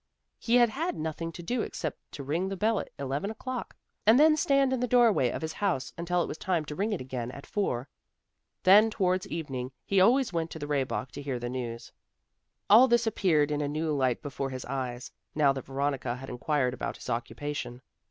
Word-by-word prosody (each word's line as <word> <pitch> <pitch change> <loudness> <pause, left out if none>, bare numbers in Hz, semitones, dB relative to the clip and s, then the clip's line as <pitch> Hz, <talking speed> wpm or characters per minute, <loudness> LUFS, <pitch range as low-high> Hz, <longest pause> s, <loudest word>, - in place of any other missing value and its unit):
He 235 - +1
had 240 -1 +6
had 320 +10 -2
nothing 160 +1 -4
to 175 - -8
do 240 +7 -1
except 155 -7 -4
to 140 - -6
ring 165 +7 -1
the 195 - -4
bell 215 +1 +2
at - - -6
eleven 140 +7 -2
o'clock, 245 +3 -5 0.3
and 225 +5 +6
then 310 +1 +6
stand 275 -3 +2
in 260 - 0
the 250 - 0
door 240 -2 +5
way 125 -9 +1
of - - -5
his 160 0 -3
house 165 - -1
until 175 +1 0
it - - -4
was - - -6
time 175 -5 0
to 150 - -6
ring 205 +6 -1
it 205 - -1
again 125 -2 -4
at 140 +2 -9
four. 135 -11 -2 0.8
Then 210 +4 +7
towards 185 -4 0
evening 135 -6 -4
he 195 -1 +3
always 240 +2 +4
went 165 -1 -1
to - - -7
the 145 - -5
Rehbock 135 -2 -2
to - - -7
hear 140 -3 -3
the 120 0 -4
news. 120 -2 -5 0.8
All 230 +6 +8
this 235 -1 +3
appeared 160 -9 +2
in 150 0 0
a 145 - 0
new 155 +2 -1
light 130 -4 0
before 140 -2 -3
his 130 -1 -6
eyes, 125 -2 -4 0.2
now 145 -2 +4
that 135 -2 -6
Veronica 135 -2 -2
had 135 +1 -8
inquired 125 0 0
about 130 - -4
his - - -11
occupation. 125 +1 -4
155 Hz, 215 wpm, -29 LUFS, 135-205 Hz, 0.8 s, All